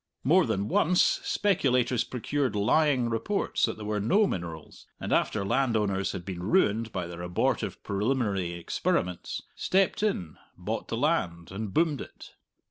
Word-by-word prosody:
More 165 +4 +4
than 100 -2 -1
once, 180 +10 +3
speculators 125 - +2
procured 130 0 -2
lying 130 +4 +3
reports 155 - 0
that 110 - -4
there 105 - -7
were 105 0 -1
no 195 - +3
minerals, 85 - -6
and - - -2
after 100 -2 +1
landowners 105 -5 +1
had 90 -3 -6
been 95 -3 -5
ruined 110 - +2
by 90 -2 -3
their 85 0 -8
abortive 90 0 -1
preliminary 100 -4 0
experiments, 85 +1 -2
stepped 190 +1 +1
in, 90 - -2 0.2
bought - - -4
the - - -3
land, 85 0 0
and 100 +1 -4
boomed 155 - +1
it. - - -11
110 Hz, 145 wpm, -28 LUFS, 95-135 Hz, 0.2 s, More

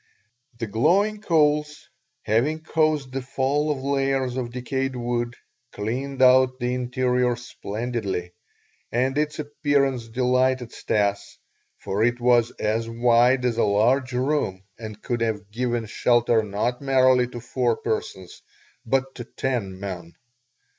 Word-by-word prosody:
The 115 - -3
glowing 180 - +2
coals, 150 -4 +1 0.4
having 135 +9 +1
caused 155 -4 0
the 135 - -2
fall 140 +3 0
of 140 -3 -2
layers 135 -2 0
of 125 -2 -3
decayed 130 +2 -3
wood, 120 0 -2 0.4
cleaned 130 +6 -2
out 130 0 +5
the 125 -1 -1
interior 125 0 0
splendidly, 110 -5 -4 0.6
and 130 +3 0
its 150 0 -1
appearance 145 -4 0
delighted 125 +1 +1
Stas, 100 -1 -1 0.4
for 100 +3 -2
it 120 +1 +1
was 120 -1 +4
as 110 +2 -1
wide 120 +2 +3
as 120 -2 0
a - - +4
large 125 +6 +2
room 125 -7 -1 0.2
and 110 -2 -9
could 120 -1 -2
have 105 -3 -2
given 120 0 -1
shelter 120 +1 +2
not 110 +5 -2
merely 130 -2 +4
to 120 -1 -8
four 120 0 -1
persons, 95 -4 -4 0.4
but 135 +2 0
to 120 - -7
ten 115 -7 -3
men. 90 -4 -6
125 Hz, 130 wpm, -24 LUFS, 115-135 Hz, 0.6 s, out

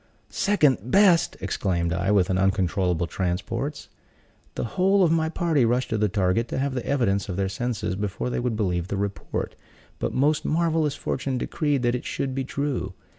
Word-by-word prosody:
"Second 155 - +2
best!" 185 -1 +4
exclaimed 90 -3 -1
I, 90 +3 -1
with 95 -3 +3
uncontrollable 95 -2 +1
transports. 100 - -3 0.7
The - - -2
whole 195 +1 +4
of 170 - +3
my 160 -1 +2
party 160 -5 +1
rushed 120 +2 +1
to 110 - +1
the 105 -1 +2
target 100 +3 +1
to - - -4
have 135 0 0
the 125 -2 -3
evidence 100 -8 +1
of 90 - -2
their 95 +1 0
senses 105 -2 -2
before 105 +5 -3
they - - -1
would 120 -2 -1
believe 90 -5 -1
the 100 - -3
report; 100 0 -3 0.5
but - - -1
most 145 +4 +2
marvelous 160 -2 +1
fortune 135 -1 -2
decreed 145 0 -1
that 120 0 +2
it 125 - -3
should 135 -1 -2
be 135 0 -2
true. 130 -9 -3
120 Hz, 180 wpm, -25 LUFS, 95-145 Hz, 0.7 s, best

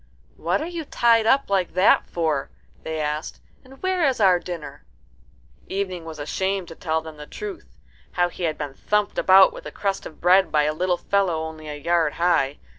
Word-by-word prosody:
"What 175 +4 -1
are - - -3
you 340 -1 -5
tied 230 -5 +3
up 275 +3 +3
like 185 -3 0
that 185 +2 +4
for?" 155 -5 -1 0.3
they 160 0 -4
asked; 150 +1 -3 0.2
"and 265 +1 -16
where 375 -1 0
is 260 -3 0
our 185 -4 +5
dinner?" 175 -4 -8 0.8
Evening 185 -3 -3
was 160 -1 -8
ashamed 190 +5 -2
to 165 - -9
tell 160 -1 -1
them 160 -1 -10
the 150 0 -10
truth 405 -5 -8 0.4
how 175 0 +2
he 175 - -4
had 155 -2 -1
been 145 -2 -5
thumped 210 +8 -1
about 190 0 +6
with - - -9
a - - -7
crust 195 -1 -3
of 155 - -15
bread 185 +2 +4
by 150 -1 +3
a 150 +1 0
little 180 +2 0
fellow 185 -6 0
only 160 -1 -8
a 150 - -5
yard 160 +1 +1
high. 160 -5 +1
175 Hz, 195 wpm, -23 LUFS, 155-200 Hz, 0.8 s, about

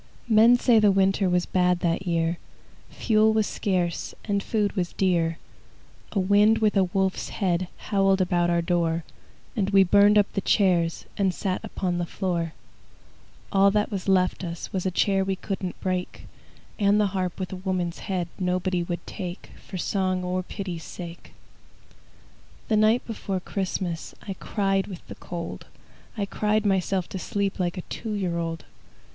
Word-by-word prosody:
Men 230 +2 +6
say 240 -2 +4
the 210 -1 +5
winter 195 0 +2
Was 180 0 +2
bad 180 -1 +2
that 175 +2 0
year; 170 0 0 0.5
Fuel 220 -1 +3
was 220 -1 +2
scarce, 180 -5 -2
And 200 -2 0
food 210 -1 0
was 180 -2 -2
dear. 170 -3 +1 0.8
A 200 - +1
wind 205 +3 +4
with 215 -1 +2
a 195 -1 +4
wolf's 190 +1 -1
head 180 -3 0
Howled 195 -2 +2
about 175 -2 +2
our 170 -1 +2
door, 170 -1 0 0.5
And 200 -3 0
we 195 -1 +6
burned 205 +3 +5
up 205 - +6
the 195 - -1
chairs 175 -6 +2
And 195 -2 +2
sat 185 -2 -2
upon 180 -2 -2
the 175 - -2
floor. 170 -4 -2 1.0
All 195 0 +5
that 210 +2 0
was 195 -2 -4
left 185 -1 +2
us 170 -1 -6
Was 190 -1 -1
a - - +2
chair 195 +1 +2
we 190 0 -1
couldn't 190 -1 -5
break, 185 -1 -3 0.5
And 205 0 +4
the 210 - +4
harp 185 -1 -2
with 185 0 -4
a - - -4
woman's 180 -2 -2
head 185 -4 -2
Nobody 180 0 0
would 170 0 -4
take, 180 -2 -7 0.2
For 190 - -5
song 185 0 0
or 180 +1 -1
pity's 180 -3 -6
sake. 170 -1 -9 1.4
The 220 - +3
night 215 +3 +3
before 200 -4 -3
Christmas 180 -3 -3
I 195 - -2
cried 195 0 -1
with 185 -4 -9
the - - -7
cold, 170 -1 -7 0.5
I 205 - 0
cried 210 +1 0
myself 190 -2 +1
to 190 - -5
sleep 200 +1 -2
Like 180 +1 -1
a - - -2
two 220 -2 -5
year 180 -4 -1
old. 165 -1 -4
190 Hz, 165 wpm, -25 LUFS, 175-200 Hz, 1.4 s, Men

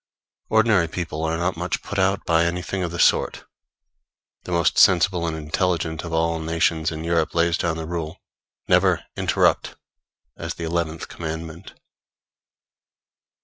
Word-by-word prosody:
Ordinary 110 -6 +3
people 80 -2 -4
are 80 +1 -1
not 90 +2 -1
much 90 +2 -3
put 100 - -4
out 95 +1 +1
by 85 0 +3
anything 90 +2 -2
of 90 - -1
the 85 - -6
sort. - - +2 1.0
The - - -6
most 85 -2 +2
sensible 90 -1 +4
and 80 -1 -3
intelligent 80 +1 -1
of 85 - -6
all 80 0 0
nations 80 0 0
in 80 0 -5
Europe 85 -1 0
lays 85 0 +3
down 85 -2 -1
the 80 - -4
rule, 85 0 -4 0.5
Never - - +3
Interrupt! - - +1 0.6
as 85 +1 -5
the 85 - -7
eleventh 80 -1 -2
commandment. 80 +2 -7
85 Hz, 145 wpm, -23 LUFS, 80-90 Hz, 1.0 s, sensible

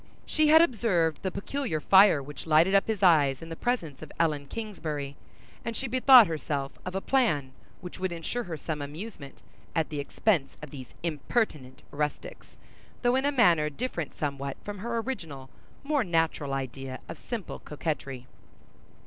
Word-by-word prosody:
She 310 -1 +2
had 320 +2 +8
observed 195 - +1
the 190 - -1
peculiar 200 - -3
fire 190 -3 +6
which 145 +3 -9
lighted 160 +5 +5
up 195 - +4
his 215 -3 -2
eyes 150 -6 +4
in 165 - -9
the 165 - -5
presence 165 - -2
of 155 - -9
Ellen 150 -4 +1
Kingsbury, 155 -10 -5 0.5
and 230 -1 -4
she 265 - -3
bethought 255 -1 +8
her 160 -4 -3 0.5
of 180 +1 -5
a - - +1
plan 170 - +1 0.3
which 180 -1 -8
would 185 -1 -1
ensure 170 +9 -4
her 165 -3 -5
some 150 0 -4
amusement 150 0 -8 0.3
at 160 -1 +1
the 150 -2 -4
expense 145 0 0
of 150 -3 -10
these 130 -4 -10
impertinent 155 - -2
rustics, 150 0 -4 0.5
though 245 +1 +3
in 265 +1 +1
a 285 - +3
manner 175 - +4
different 170 - -4
somewhat 140 -2 -3
from 205 -1 -6
her 235 +3 -3
original 160 - -5 0.3
more 290 -2 +1
natural 165 -5 0
idea 135 0 -5
of - - -8
simple 230 -7 -6
coquetry. 140 -4 -4
165 Hz, 165 wpm, -28 LUFS, 145-225 Hz, 0.5 s, had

